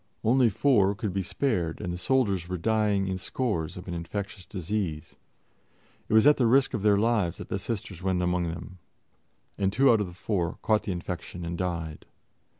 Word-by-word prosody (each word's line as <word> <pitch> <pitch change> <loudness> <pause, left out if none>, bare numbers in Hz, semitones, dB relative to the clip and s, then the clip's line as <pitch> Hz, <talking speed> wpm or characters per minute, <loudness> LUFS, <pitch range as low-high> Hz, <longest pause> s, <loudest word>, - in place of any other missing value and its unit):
Only 125 +1 +4
four 100 -4 +3
could 105 -2 -3
be 95 - 0
spared, 90 - -1
and 90 - -3
the - - -4
soldiers 100 -6 +1
were 90 - -2
dying 105 +1 +1
in 95 -1 -2
scores 95 -8 -2
of 90 - -9
an 85 - -4
infectious 95 +2 -5
disease. 90 -4 -3 0.9
It - - -1
was 110 - +6
at 150 0 +7
the 125 - +3
risk 135 +3 +4
of 110 - -1
their 105 -1 +4
lives 105 -5 +1
that - - -9
the 95 - -2
Sisters 95 -4 -5
went 95 -1 0
among 90 0 +1
them, 85 +2 -7 0.8
and 95 -1 +2
two 135 +4 +5
out 110 -2 +3
of 100 - -1
the 90 - -10
four 90 -2 -2
caught 110 -1 +3
the 100 - -2
infection 90 0 -5
and 85 +1 -3
died. 85 -3 -4
95 Hz, 195 wpm, -27 LUFS, 90-110 Hz, 0.9 s, at